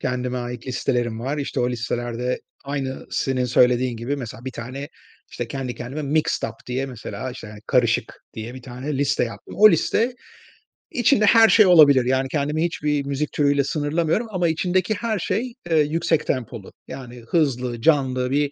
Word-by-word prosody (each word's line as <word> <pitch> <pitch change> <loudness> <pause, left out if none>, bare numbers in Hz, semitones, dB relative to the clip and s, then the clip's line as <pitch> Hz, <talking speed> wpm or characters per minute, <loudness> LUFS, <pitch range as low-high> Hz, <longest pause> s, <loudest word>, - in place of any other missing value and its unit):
Kendime 125 0 -2
ait 120 0 -6
listelerim 120 -3 -1
var. 140 +5 -2
İşte, 140 - -2
o 125 0 +1
listelerde 120 +1 -3 0.2
aynı 135 -1 -4
senin 130 -1 0
söylediğin 125 0 +3
gibi, 120 +5 -3
mesela, 120 -3 -8
bir 130 - -5
tane, 130 +5 -6 0.4
işte, 120 -1 -5
kendi 130 -2 -4
kendime 135 +6 -6
mixed 150 +2 0
up - - -10
diye, 130 +2 -2
mesela, 120 -1 -6
işte, 125 -2 -9
hani, 105 0 -11
karışık 125 -3 +1
diye 115 +2 -6
bir 130 - -10
tane 130 +2 -5
liste 140 -3 +1
yaptım. 115 - -9
O 215 0 +9
liste 240 +3 +1 0.8
içinde 235 -2 +3
her 225 +1 +7
şey 215 - +7
olabilir. 145 -8 +7
Yani, 130 +1 +1
kendimi 150 +2 0
hiçbir 150 -4 -1
müzik 140 +2 -2
türüyle 145 -1 +2
sınırlamıyorum 155 - 0
ama 180 -4 0
içindeki 180 +5 +1
her 220 -1 -2
şey, 235 +8 -2 0.2
eee, 165 - +3
yüksek 155 +1 +1
tempolu. 120 -5 -3 0.2
Yani, 125 -2 -9
hızlı, 125 -7 0
canlı 130 -4 +2
bir 145 0 +1
135 Hz, 170 wpm, -22 LUFS, 125-155 Hz, 0.8 s, O